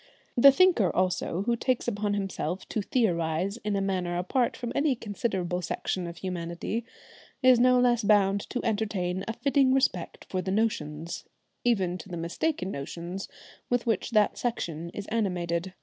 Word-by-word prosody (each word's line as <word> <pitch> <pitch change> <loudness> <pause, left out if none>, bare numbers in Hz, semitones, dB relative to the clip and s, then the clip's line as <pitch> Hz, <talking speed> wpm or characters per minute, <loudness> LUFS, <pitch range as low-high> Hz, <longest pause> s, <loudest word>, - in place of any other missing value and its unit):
The 275 +2 +9
thinker 275 - +4
also 185 0 0
who 235 +2 +1
takes 250 +1 0
upon 205 -2 0
himself 195 -1 -3
to 215 - -1
theorise 185 -3 0
in 210 -3 -2
a 195 - +1
manner 180 -3 -1
apart 235 +8 0
from 240 -2 -4
any 285 -2 +2
considerable 195 -5 -2
section 180 0 -2
of 170 0 -8
humanity, 175 +5 -3 0.6
is 255 -2 +7
no 250 +1 +5
less 240 -2 +3
bound 200 -1 +4
to 250 - -3
entertain 200 -5 -1
a 225 - -2
fitting 270 +1 +3
respect 225 -10 0
for 185 - -2
the 185 - -4
notions, 170 -7 -1 0.4
even 190 -7 +1
to 195 - -10
the 175 - -5
mistaken 185 - -2
notions, 170 +6 -5 0.4
with 245 0 +1
which 225 -5 0
that 215 -3 +2
section 170 -9 -3
is 200 +3 -6
animated. 180 -4 -1
200 Hz, 160 wpm, -28 LUFS, 180-235 Hz, 0.6 s, The